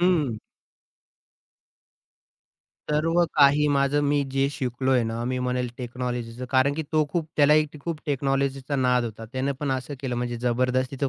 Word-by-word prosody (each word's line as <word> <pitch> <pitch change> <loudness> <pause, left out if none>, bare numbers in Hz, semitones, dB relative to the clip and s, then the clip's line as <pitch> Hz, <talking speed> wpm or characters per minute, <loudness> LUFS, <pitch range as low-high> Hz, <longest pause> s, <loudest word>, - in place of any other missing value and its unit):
हं. 160 -11 +2 2.5
सर्व 165 +3 +2
काही 145 0 +5
माझं, 140 +1 +2
मी 145 0 +2
जे 135 0 +2
शिकलोय 130 -2 0
ना. 115 +1 -3
मी 130 +1 -1
म्हणेल 125 0 -1
टेक्नॉलॉजीचं. 125 -1 -4
कारण 135 +2 +3
की 160 - -2
तो 155 -1 +3
खूप 165 -3 -1
त्यालाही 150 +1 +5
खूप 165 0 -4
टेक्नॉलॉजीचा 135 0 -1
नाद 125 -2 +2
होता. 115 0 -6
त्याने 130 +2 -1
पण 145 - -1
असं 130 +2 -4
केलं 130 -3 -3
म्हणजे 120 0 -2
जबरदस्तीच 130 +2 0
तो 140 - +1
135 Hz, 145 wpm, -25 LUFS, 125-145 Hz, 2.5 s, काही